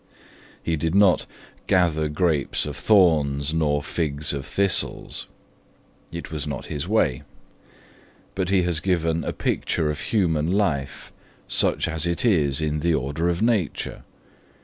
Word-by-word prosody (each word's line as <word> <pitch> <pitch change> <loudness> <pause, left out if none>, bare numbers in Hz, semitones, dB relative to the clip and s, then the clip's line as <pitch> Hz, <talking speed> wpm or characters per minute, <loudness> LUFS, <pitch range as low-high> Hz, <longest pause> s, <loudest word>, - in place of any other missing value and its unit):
He 80 -1 0
did 80 +3 -1
not 100 -2 +4 0.4
'gather 80 -4 +2
grapes 75 -2 0
of 75 -2 -5
thorns 75 -8 +3
nor 75 -3 +1
figs 75 -3 -2
of 70 -1 -5
thistles'. 100 -2 0 0.8
It 85 -1 -7
was 75 -2 -3
not 70 -3 -5
his 75 +3 -3
way. 95 - +1 1.1
But 95 -2 -2
he 95 -2 +3
has 85 -3 +1
given 85 -3 0
a - - -2
picture 80 -3 -1
of 75 - -6
human 85 -6 +1
life, 80 -9 -1 0.4
such - - +1
as 80 0 -2
it 85 +7 0
is 75 - +2
in 75 -1 -1
the 85 +1 +1
order 75 +6 -1
of 85 +4 -1
nature. 110 -9 -1
80 Hz, 140 wpm, -24 LUFS, 75-90 Hz, 1.1 s, not